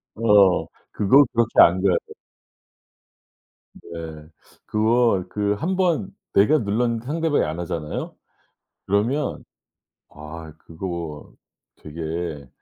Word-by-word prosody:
어. 105 Hz, -4 st, +4 dB, 0.3 s
그거 130 Hz, +8 st, +5 dB
그렇게 115 Hz, -1 st, +1 dB
안 90 Hz, +2 st, +5 dB
가요. 95 Hz, -2 st, +3 dB, 1.8 s
네. -, -, -16 dB, 0.8 s
그거 110 Hz, -2 st, +2 dB
그 105 Hz, -1 st, 0 dB
1 170 Hz, -, -2 dB
번 175 Hz, -, 0 dB, 0.2 s
내가 105 Hz, +11 st, +4 dB
눌렀는데 115 Hz, +2 st, -1 dB
상대방이 160 Hz, +1 st, 0 dB
안 80 Hz, +3 st, -4 dB
하잖아요? 80 Hz, -3 st, -5 dB, 0.7 s
그러면 120 Hz, +9 st, -1 dB, 0.6 s
아 80 Hz, +1 st, -10 dB
그거 80 Hz, -2 st, -7 dB, 0.4 s
되게 80 Hz, -2 st, -6 dB
100 Hz, 175 characters per minute, -22 LUFS, 85-120 Hz, 1.8 s, 그거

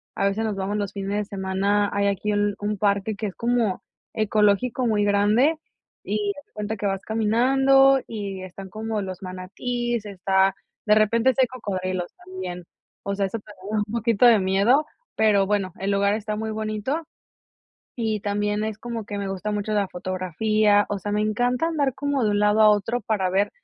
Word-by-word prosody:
a 195 Hz, -, 0 dB
veces 200 Hz, +3 st, -1 dB
nos 215 Hz, -2 st, -2 dB
vamos 195 Hz, +2 st, -2 dB
los 205 Hz, -1 st, -3 dB
fines 195 Hz, -1 st, -4 dB
de 210 Hz, -, -1 dB
semana 200 Hz, +1 st, 0 dB
hay 200 Hz, 0 st, 0 dB
aquí 200 Hz, +1 st, -1 dB
un 205 Hz, 0 st, +1 dB
un 210 Hz, 0 st, -2 dB
parque 200 Hz, +1 st, 0 dB
que 210 Hz, +2 st, -3 dB
es 195 Hz, -, -7 dB
como 235 Hz, -5 st, 0 dB, 0.3 s
ecológico, 215 Hz, +3 st, +2 dB
muy 210 Hz, -2 st, +2 dB
grande, 210 Hz, +9 st, +3 dB, 0.5 s
y 205 Hz, 0 st, -1 dB
haz 285 Hz, -, -12 dB
de -, -, -42 dB
cuenta 210 Hz, +1 st, -3 dB
que 205 Hz, -, -4 dB
vas 195 Hz, -1 st, -1 dB
caminando 270 Hz, +5 st, +4 dB
y 200 Hz, -4 st, -5 dB
están 190 Hz, +1 st, -9 dB
como 220 Hz, +1 st, -3 dB
los 185 Hz, -1 st, -6 dB
manatíes, 225 Hz, +6 st, -3 dB
está 190 Hz, -1 st, +1 dB, 0.3 s
de 210 Hz, -, +5 dB
repente 230 Hz, +4 st, +3 dB
sí -, -, -11 dB
hay 255 Hz, -, +4 dB
cocodrilos 185 Hz, -7 st, -4 dB
también. 365 Hz, -, -6 dB, 0.4 s
O 200 Hz, 0 st, -2 dB
sea, 200 Hz, 0 st, 0 dB
eso 225 Hz, +4 st, -5 dB
te 205 Hz, -, -26 dB, 0.2 s
da 215 Hz, -, 0 dB
un -, -, -9 dB
poquito 235 Hz, 0 st, +2 dB
de 235 Hz, -2 st, +7 dB
miedo, 200 Hz, +10 st, +3 dB, 0.3 s
pero 205 Hz, -3 st, +3 dB
bueno, 195 Hz, -3 st, 0 dB
el 195 Hz, -, -2 dB
lugar 200 Hz, 0 st, +2 dB
está 215 Hz, 0 st, -3 dB
muy 220 Hz, +1 st, -3 dB
bonito. 215 Hz, +7 st, -2 dB, 1.0 s
Y 220 Hz, -3 st, -1 dB
también 205 Hz, +1 st, -1 dB
es 220 Hz, -1 st, -4 dB
como 230 Hz, -1 st, -5 dB
que 205 Hz, -1 st, -5 dB
me 200 Hz, -1 st, -3 dB
gusta 195 Hz, +2 st, -3 dB
mucho 210 Hz, +1 st, -2 dB
la 205 Hz, -2 st, +1 dB
fotografía. 205 Hz, +4 st, +1 dB
O 205 Hz, -, -2 dB
sea, 205 Hz, +2 st, -5 dB
me 210 Hz, 0 st, +1 dB
encanta 245 Hz, +7 st, +1 dB
andar 295 Hz, -5 st, 0 dB
como 285 Hz, -1 st, -1 dB
de 210 Hz, -, +2 dB
un 205 Hz, -, +1 dB
lado 210 Hz, +1 st, +3 dB
a 215 Hz, -, +8 dB
otro 210 Hz, +4 st, 0 dB
para 195 Hz, -3 st, 0 dB
ver 195 Hz, +2 st, +1 dB
210 Hz, 195 wpm, -24 LUFS, 200-225 Hz, 1.0 s, a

